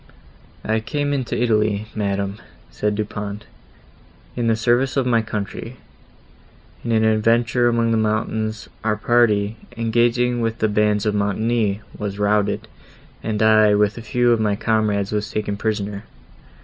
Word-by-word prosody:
"I 110 +1 +1
came 145 +6 -2
into 130 -5 -2
Italy, 110 -3 +1
madam," 100 -1 -2 0.3
said 105 0 -1
Du 105 0 -1
Pont, 105 0 -6 0.9
"in 120 -1 -1
the 115 - +3
service 120 +4 +1
of 135 - +2
my 115 -2 +3
country. 110 +2 -5 1.1
In 120 - -2
an 110 -1 +3
adventure 115 +2 +3
among 115 -1 +1
the 115 - +2
mountains 110 0 -1 0.2
our 110 -1 +1
party, 105 -2 +2 0.2
engaging 120 +1 +1
with 115 0 -1
the 110 - +1
bands 105 0 +1
of 105 - +1
Montoni, 105 +1 0
was 100 -1 -4
routed, 105 0 +1 0.5
and 110 -1 -1
I, 110 -1 +5
with 105 0 +2
a 115 - -7
few 120 +1 +1
of 115 - +3
my 105 -2 +1
comrades, 105 -2 0
was 105 -1 -2
taken 105 -1 -2
prisoner. 105 -1 -3
110 Hz, 150 wpm, -21 LUFS, 105-115 Hz, 1.1 s, I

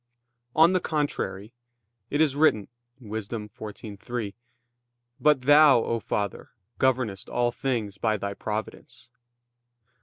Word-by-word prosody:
On 165 +3 +6
the 185 - +3
contrary, 140 - -3 0.6
It 145 - +1
is 145 -4 +3
written 145 -10 +3 0.3
(Wis. 110 -3 -5
14:3): 105 0 -6 0.9
"But 150 -3 +4
Thou, 145 -3 +6
O 115 - -1
Father, 100 -2 -3 0.3
governest 125 -7 0
all 120 0 +1
things 115 -7 -3
by 110 +1 +1
Thy 100 0 -4
Providence." 110 +3 -6
115 Hz, 110 wpm, -26 LUFS, 105-140 Hz, 0.9 s, On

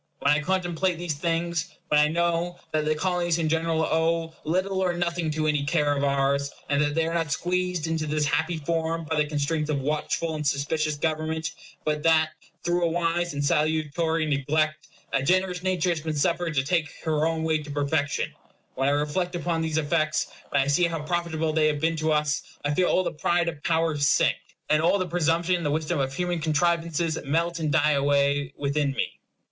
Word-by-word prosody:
When 140 - +3
I 150 - +1
contemplate 180 0 0
these 175 -2 -2
things; 170 +2 -2
when 150 - +5
I 150 - +5
know 170 +2 0
that 155 -1 0
the 155 0 +1
Colonies 175 0 0
in 165 -2 0
general 160 0 +1
owe 165 0 0
little 185 +4 0
or 180 -1 +1
nothing 175 -1 -1
to 155 0 -1
any 150 -2 +1
care 145 -1 +1
of 140 - -1
ours, 140 0 +1 0.2
and 140 0 +2
that 145 0 0
they 165 0 +2
are 165 - -2
not 165 -3 -1
squeezed 180 +1 -1
into 160 -1 -1
this 150 0 0
happy 160 +3 0
form 165 +1 -1
by 160 0 -2
the 150 0 +2
constraints 150 +1 -1
of 145 -2 0
watchful 155 +3 -1
and 150 -1 -2
suspicious 150 +2 0
government, 160 +1 -2 0.3
but 150 -1 0
that, 160 0 +3 0.3
through 175 0 +1
a - - +4
wise 170 -1 0
and 145 0 -1
salutary 155 +2 +1
neglect, 155 +2 0 0.3
a 135 - +2
generous 180 +4 +1
nature 185 -2 0
has 160 -2 -2
been 155 0 -3
suffered 165 +2 0
to 135 - +2
take 160 +1 0
her 155 -1 +1
own 165 -1 -1
way 160 -1 +1
to 150 0 -9
perfection; 145 0 -1 0.4
when 135 +1 +1
I - - +2
reflect 160 +5 -1
upon 170 -1 -1
these 160 -1 -1
effects, 155 0 0 0.2
when 140 -1 +2
I - - -5
see 145 +5 +3
how 165 -2 -2
profitable 160 -1 -1
they 155 -1 +3
have 150 -1 0
been 165 +2 +1
to 155 0 0
us, 150 -1 +1 0.2
I 145 - +1
feel 180 +4 +2
all 185 - +3
the - - -2
pride 170 +2 +1
of 160 -3 -4
power 165 -1 +1
sink, 145 0 +3 0.3
and 155 0 +3
all 175 +5 +3
presumption 170 0 +1
in 170 - -5
the 145 - 0
wisdom 155 0 -1
of 135 -1 0
human 175 0 -1
contrivances 165 +1 0
melt 165 +4 0
and 155 -2 -1
die 150 -1 +3
away 140 0 +2
within 140 0 0
me. - - -3
160 Hz, 205 wpm, -26 LUFS, 150-170 Hz, 0.4 s, when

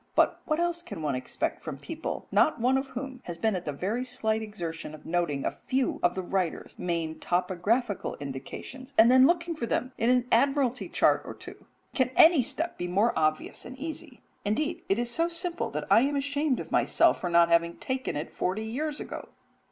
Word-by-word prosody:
But - - +3
what 310 0 0
else 345 0 0
can 205 - -7
one 145 -2 0
expect 130 0 -3
from - - -5
people, 325 -1 -5
not 310 - +3
one 250 +3 +3
of 265 +1 0
whom 260 0 -6
has 170 -1 -6
been 220 +4 +1
at 180 - -4
the 150 - -1
very 200 - -2
slight 220 -3 -1
exertion 170 -7 -6
of 155 - -16
noting 165 -5 -1
a - - +1 0.2
few 260 0 0
of 175 - +2
the 190 - -3
writer's 180 -2 -2
main 165 -3 -2
topographical 190 +5 0
indications, 145 - -8
and 230 +2 +7
then 260 +1 +7
looking 340 0 +1
for 235 -6 -3
them 255 +3 -1
in 230 - +2
an 250 -1 +3
Admiralty 260 0 +2
chart - - +3
or - - -8
two? - - -12 0.3
Can 260 -2 +2
any 325 -3 +7
step 325 +8 -3
be 175 - -2
more 200 +6 +2
obvious 155 0 0
and 255 +2 -9
easy 305 -2 -7 0.2
indeed, 295 +11 -1
it 195 - +3
is 240 0 -1
so 330 +7 +1
simple 345 0 -2
that - - -4
I 225 - +7
am 285 +3 +1
ashamed 285 0 0
of - - -7
myself - - +3
for 180 - -1
not 170 0 +5
having 170 0 +2
taken 260 0 -3
it 150 +2 -4
forty 190 +4 -1
years 290 +7 -3
ago. - - -7
235 Hz, 205 wpm, -28 LUFS, 175-275 Hz, 0.3 s, and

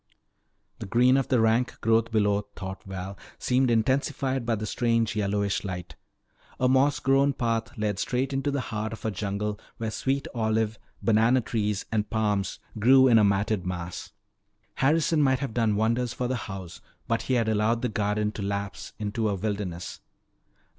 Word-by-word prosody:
The - - -6
green 125 +5 +4
of 135 -1 +1
the 125 - +2
rank 115 +2 +2
growth 115 +1 +2
below, 105 -2 +1
thought 95 0 -6
Val, 95 0 -6 0.2
seemed 130 0 +2
intensified 130 +1 0
by 115 - +2
the 110 0 -4
strange 115 -1 0
yellowish 100 -1 0
light. 90 -3 -6 0.6
A 130 - +3
moss 135 +2 +3
grown 135 +1 +3
path 115 -3 -2
led 105 -2 -1
straight 130 +5 -1
into 135 +2 0
the 140 -1 -1
heart 110 -2 -4
of 110 - -9
a 110 - 0
jungle 105 +2 -3 0.2
where 110 -1 -3
sweet 135 +4 -1
olive, 110 -2 0 0.2
banana 115 +3 +4
trees, 105 -4 -2
and 105 -1 0
palms 105 -4 0 0.2
grew 130 +4 +6
in 115 -3 +6
a - - +5
matted 100 0 +1
mass. 90 -1 -5 0.6
Harrison 155 +3 +2
might 130 -2 +3
have 135 -3 -4
done 110 -3 +2
wonders 115 +3 +1
for 125 0 -2
the 130 - -1
house 95 -3 -7 0.3
but 115 0 0
he 130 - 0
had 115 -2 +1
allowed 110 +2 +1
the - - +2
garden 105 -1 0
to 105 - -7
lapse 100 0 -4
into 105 +1 -1
a 100 - 0
wilderness. 95 -4 -4
110 Hz, 170 wpm, -27 LUFS, 105-125 Hz, 0.6 s, grew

